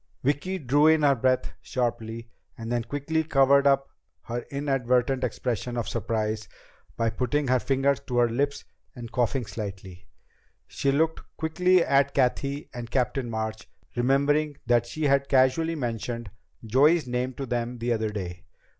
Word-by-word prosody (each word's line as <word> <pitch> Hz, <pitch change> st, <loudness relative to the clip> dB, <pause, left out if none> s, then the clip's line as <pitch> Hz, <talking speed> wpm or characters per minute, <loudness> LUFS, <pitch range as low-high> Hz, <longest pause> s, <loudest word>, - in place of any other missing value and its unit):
Vicki 145 Hz, +8 st, 0 dB
drew 145 Hz, 0 st, +3 dB
in 160 Hz, -1 st, +4 dB
her 140 Hz, -1 st, +6 dB
breath 130 Hz, 0 st, 0 dB
sharply, 115 Hz, -2 st, -3 dB, 0.3 s
then 115 Hz, +1 st, -2 dB
quickly 145 Hz, +6 st, -1 dB
covered 140 Hz, -1 st, +4 dB
up 135 Hz, 0 st, +3 dB, 0.4 s
her 120 Hz, +1 st, -4 dB
inadvertent 135 Hz, -2 st, 0 dB
expression 120 Hz, 0 st, -2 dB
of 120 Hz, -, -2 dB
surprise 110 Hz, -3 st, -2 dB, 0.5 s
by 115 Hz, -, +1 dB
putting 135 Hz, +4 st, -1 dB
her 130 Hz, 0 st, +3 dB
fingers 135 Hz, +2 st, +1 dB
to 125 Hz, -3 st, -4 dB
her 120 Hz, -1 st, +5 dB
lips 140 Hz, +5 st, -1 dB, 0.3 s
and 120 Hz, -2 st, -8 dB
coughing 125 Hz, +1 st, 0 dB
lightly. 95 Hz, -3 st, -7 dB, 0.6 s
She 140 Hz, -, -1 dB
looked 160 Hz, +3 st, +1 dB, 0.2 s
quickly 180 Hz, +3 st, +3 dB
at 140 Hz, 0 st, +2 dB
Cathy 140 Hz, +2 st, 0 dB
and 120 Hz, -1 st, -6 dB
Captain 125 Hz, 0 st, -1 dB
March, 110 Hz, -1 st, -4 dB, 0.3 s
remembering 140 Hz, +4 st, +2 dB
that 120 Hz, 0 st, +2 dB
she 155 Hz, +5 st, -5 dB
had 140 Hz, -1 st, +2 dB
casually 140 Hz, +5 st, +3 dB
mentioned 120 Hz, -, -4 dB, 0.3 s
Joey's 145 Hz, +7 st, +4 dB
name 125 Hz, +1 st, -2 dB
to 135 Hz, -, -4 dB
them 120 Hz, 0 st, -2 dB
the 120 Hz, +1 st, 0 dB
other 110 Hz, -1 st, -1 dB
day. 90 Hz, -4 st, -6 dB
130 Hz, 145 wpm, -26 LUFS, 115-140 Hz, 0.6 s, her